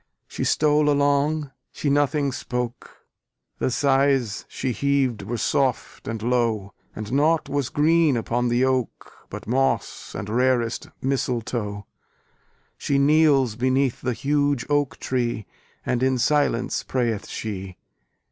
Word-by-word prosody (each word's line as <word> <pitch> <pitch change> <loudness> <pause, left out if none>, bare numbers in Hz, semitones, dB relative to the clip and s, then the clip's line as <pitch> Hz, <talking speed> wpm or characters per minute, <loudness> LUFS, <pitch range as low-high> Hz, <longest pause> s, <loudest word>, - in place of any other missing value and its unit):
She - - -4
stole 150 -1 +3
along, 145 +1 +1 0.2
she 145 - -2
nothing 145 0 +2
spoke, 125 -1 -5 0.5
The - - +1
sighs 135 -4 +1
she 130 - -3
heaved 135 -3 0
were 115 +5 -4
soft 130 +2 -1
and 110 -1 -4
low, 115 -5 0 0.2
And 110 0 -6
naught 155 +3 +2
was 140 -2 -1
green 155 -2 +3
upon 120 +2 -1
the 120 +2 +2
oak, 130 -3 -2 0.2
But - - -8
moss 135 +4 -1
and - - -5
rarest 120 0 0
mistletoe: 115 -6 -2 0.9
She 140 - 0
kneels 140 -4 +4
beneath 130 +1 +1
the 125 0 -1
huge 145 +1 0
oak 145 -2 +1
tree, 120 -4 -2 0.4
And 125 -1 0
in 130 0 +2
silence 125 -2 +1
prayeth 120 -5 -2
she. 95 -4 -6
130 Hz, 125 wpm, -24 LUFS, 120-140 Hz, 0.9 s, kneels